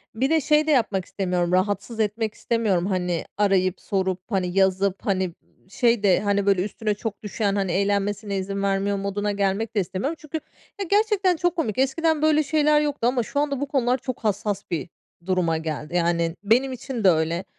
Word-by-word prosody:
bir 260 +4 +1
de 320 0 +3
şey 300 +2 +3
de - - +3
yapmak 215 - +1
istemiyorum 180 -3 -1
rahatsız 205 +4 0
etmek 215 0 -1
istemiyorum. 210 -7 0
Hani, 180 -3 -1
arayıp, 190 -3 +2
sorup, 190 -2 -1
hani, 190 -2 +1
yazıp, 190 0 +2
hani, 190 -2 +1 0.2
ımm, - - -32
şey 235 +1 +2
de, 190 -3 +4
hani, 200 -1 0
böyle 195 -2 +3
üstüne 210 +1 -2
çok 215 +1 -6
düşen, 205 -1 -1
hani, 195 -3 0
eğlenmesine 200 +1 0
izin 195 +1 -3
vermiyor 200 +1 0
moduna 200 +1 -2
gelmek 200 +3 -1
de - - +3
istemiyorum. 195 - -2
Çünkü, 315 +1 -5 0.4
ya, 395 - -2
gerçekten 405 -3 +3
çok 350 +1 0
komik. 275 - -2
Eskiden 305 +4 +1
böyle 310 0 +4
şeyler 300 0 +3
yoktu 290 -5 0
ama 245 -1 +1
şu 285 - -3
anda 285 -2 0
bu 285 - -1
konular 255 -3 +1
çok 255 0 -5
hassas 205 -1 -1
bir 170 +1 -2 0.4
duruma 180 -3 +1
geldi. 160 +1 -5
Yani, 170 -1 +1
benim 250 +5 +2
için 255 -2 -5
de 190 - +7
öyle, 165 +2 +1
205 Hz, 190 wpm, -24 LUFS, 190-260 Hz, 0.4 s, de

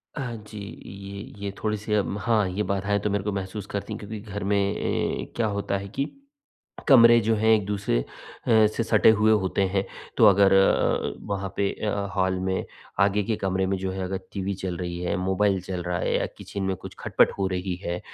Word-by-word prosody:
हाँ 125 -5 -4
जी, 105 - -10 0.3
ये 100 +1 -8 0.2
ये, 100 - -2
थोड़ी 105 -1 0
सी 105 +1 -4
अम, 100 -1 0
हाँ 110 -4 +2
ये 100 +3 -1
बाधाएँ 100 +1 0
तो 105 - -1
मेरे 100 -1 -1
को 105 - -1
महसूस 95 +1 -4
करती 100 - -4
है, - - -6
क्योंकि 105 +1 -7
घर 105 -1 -6
में 100 +1 +1
एँ 100 0 -1
क्या 115 -2 +1
होता 100 -1 -1
है 100 0 -6
कि, 135 +8 -3 0.8
कमरे 120 -4 +8
जो 115 +1 +2
हैं 110 +1 +1
एक 105 -2 +1
दूसरे 100 -11 0
अ, - - -5 0.4
से 110 -1 +4
सटे 110 -1 +5
हुए 110 +1 +5
होते 100 -2 +1
हैं, 95 +1 0 0.3
तो - - +5
अगर 100 -1 +6
अ 95 - +7 0.5
अ, - - -3 0.2
वहाँ 100 -1 -2
पे 100 - +2 0.2
अ, - - +2 0.3
हॉल 95 0 +1
में, 95 0 -1 0.4
आगे 100 +1 +3
के 110 +2 -1
कमरे 95 -1 0
में 95 +1 0
जो 95 0 -3
है, 95 0 -4
अगर 95 +1 -3
टीवी 100 0 -2
चल 95 -2 -4
रही 85 0 -4
है, 90 - -1
मोबाइल 95 +1 +1
चल 90 -1 -5
रहा 90 0 -2
है - - 0
या - - -1
किचन 100 - -6
में 95 0 0
कुछ - - -10
खटपट - - +3
हो 95 - +1
रही 90 0 -2
है, 90 +1 -2
100 Hz, 220 wpm, -25 LUFS, 95-105 Hz, 0.8 s, कमरे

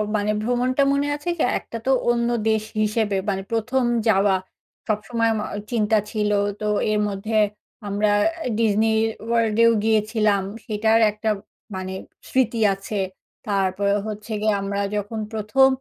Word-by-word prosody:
মানে 210 0 +1
ভ্রমণটা 245 +4 +1
মনে 280 +1 +1
আছে 295 +4 -5
কি, - - -2 0.2
একটা 230 - -8
তো 265 - +3 0.2
অন্য 235 0 +2 0.2
দেশ 220 -1 +1 0.2
হিসেবে 215 -1 +1
মানে 195 -1 -1
১ম 245 +3 0 0.2
যাওয়া। 195 -2 +4 0.5
সবসময় 225 +2 0
আমা 210 -1 -2 0.3
চিন্তা 220 -2 +2
ছিল 210 -1 0 0.3
তো 215 - -4 0.3
এর 210 - +1
মধ্যে 205 +2 -2 0.5
আমরা 205 +1 +1 0.4
এ - - -1
Disney 220 0 +3 0.4
World 230 -2 +1
এও 230 - +6
গিয়েছিলাম। 215 -2 +2 0.2
সেটার 220 0 +2
একটা 215 +1 -3 0.5
মানে 185 0 -4 0.4
স্মৃতি 240 -3 +1
আছে। 195 +2 -5 0.5
তারপরে 200 0 +1
হচ্ছে 215 +1 -7
গিয়ে 215 0 +2
আমরা 200 0 -2 0.2
যখন 210 +2 -3
১ম 220 +5 +4
215 Hz, 140 wpm, -23 LUFS, 205-230 Hz, 0.5 s, এও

